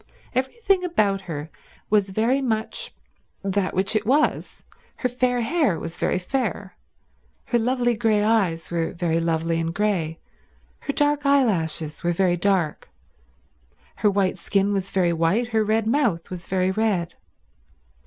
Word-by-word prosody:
Everything 375 Hz, -, +1 dB
about 210 Hz, -, +1 dB
her 160 Hz, -4 st, -6 dB, 0.4 s
was 205 Hz, -2 st, +3 dB
very 230 Hz, +7 st, +1 dB
much 220 Hz, -4 st, -2 dB, 0.5 s
that 195 Hz, -1 st, -1 dB
which 190 Hz, +3 st, 0 dB
it 215 Hz, -, +2 dB
was. 285 Hz, +7 st, 0 dB, 0.3 s
Her -, -, -1 dB
fair 250 Hz, 0 st, 0 dB
hair 270 Hz, -, +1 dB
was 165 Hz, +1 st, -6 dB
very -, -, +1 dB
fair, 205 Hz, -1 st, -3 dB, 0.7 s
her 240 Hz, -, +1 dB
lovely 240 Hz, +1 st, +1 dB
grey 215 Hz, -2 st, +2 dB
eyes 195 Hz, -8 st, +1 dB
were 165 Hz, -1 st, -1 dB
very 170 Hz, -1 st, 0 dB
lovely 165 Hz, 0 st, 0 dB
and 165 Hz, 0 st, -1 dB
grey, 175 Hz, -5 st, -1 dB, 0.6 s
her 280 Hz, -, -4 dB
dark 290 Hz, 0 st, +2 dB
eyelashes 180 Hz, -, +1 dB
were 175 Hz, 0 st, +1 dB
very 180 Hz, 0 st, +2 dB
dark, 175 Hz, -4 st, 0 dB, 1.1 s
her 210 Hz, -, +3 dB
white 195 Hz, -2 st, 0 dB
skin 200 Hz, 0 st, +1 dB
was 195 Hz, -1 st, -2 dB
very 180 Hz, -3 st, +1 dB
white, 175 Hz, +9 st, +1 dB
her 220 Hz, -2 st, +2 dB
red 215 Hz, +1 st, +1 dB
mouth 225 Hz, -, 0 dB
was 180 Hz, -1 st, -7 dB
very 185 Hz, 0 st, +1 dB
red. 190 Hz, -5 st, 0 dB
200 Hz, 145 wpm, -23 LUFS, 175-240 Hz, 1.1 s, was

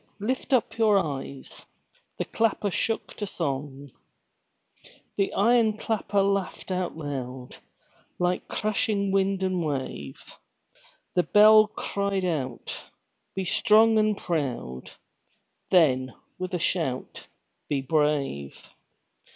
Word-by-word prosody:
Lift 250 Hz, +7 st, -2 dB
up 230 Hz, -3 st, +1 dB
your 215 Hz, -3 st, +5 dB
eyes!" 140 Hz, -5 st, -4 dB, 0.5 s
The -, -, -2 dB
clapper 220 Hz, -2 st, 0 dB
shook 225 Hz, +5 st, -2 dB
to 205 Hz, -, -3 dB
song. 140 Hz, -5 st, -4 dB, 1.2 s
The 195 Hz, -1 st, 0 dB
iron 225 Hz, 0 st, +3 dB
clapper 210 Hz, -3 st, 0 dB
laughed 195 Hz, -1 st, -1 dB
aloud, 140 Hz, -8 st, -4 dB, 0.6 s
Like 180 Hz, 0 st, 0 dB
clashing 205 Hz, -1 st, 0 dB
wind 195 Hz, 0 st, +1 dB
and 185 Hz, -2 st, 0 dB
wave; 130 Hz, -, -5 dB, 0.7 s
The 180 Hz, -, +4 dB
bell 215 Hz, +3 st, +7 dB
cried 200 Hz, -2 st, -2 dB
out 135 Hz, -8 st, -3 dB, 0.5 s
"Be 190 Hz, 0 st, -2 dB
strong 220 Hz, +3 st, +4 dB
and 215 Hz, -1 st, +2 dB
proud!" 130 Hz, -, -3 dB, 0.8 s
Then, 130 Hz, -8 st, +3 dB, 0.2 s
with 185 Hz, 0 st, -3 dB
a -, -, +1 dB
shout, 160 Hz, -7 st, -2 dB, 0.4 s
"Be 140 Hz, -2 st, 0 dB
brave!" 140 Hz, -, -1 dB
185 Hz, 100 wpm, -26 LUFS, 140-210 Hz, 1.2 s, bell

